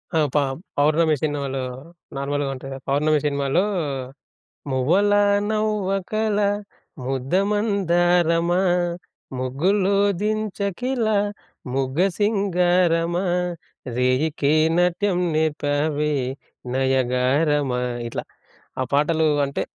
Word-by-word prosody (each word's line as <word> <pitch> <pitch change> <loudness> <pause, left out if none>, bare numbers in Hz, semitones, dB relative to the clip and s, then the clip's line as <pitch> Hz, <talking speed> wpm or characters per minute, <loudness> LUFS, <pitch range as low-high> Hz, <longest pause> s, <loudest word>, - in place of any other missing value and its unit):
ఆ! - - +4
ప - - -10 0.4
పౌర్ణమి 155 +2 +3
సినిమాలో 140 -3 -2 0.6
నార్మల్‌గా 140 0 -1
ఉంటది 135 +1 -9
కదా! 135 - -8
పౌర్ణమి 150 +2 +2
సినిమాలో 140 +5 +1 1.1
మువ్వలా 190 +11 +3 0.3
నవ్వకల 215 0 0 0.7
ముద్దమందారమా, 175 - +1 0.8
ముగ్గులో 185 +10 +1 0.3
దించకిల 215 +3 -1 0.7
ముగ్గ 135 +2 -1 0.2
సింగారమా, 180 -4 +2 0.7
రేయికే 140 +3 +1 0.2
నాట్యం 180 +1 +1 0.2
నేర్పావే 150 -1 0 0.6
నయగారమా, 130 +1 +1 0.3
ఇట్లా - - -5 0.6
ఆహ్, 130 - -2
పాటలు 155 +2 +2 0.2
అంటే 140 - -3
160 Hz, 75 wpm, -22 LUFS, 140-195 Hz, 1.1 s, ఆ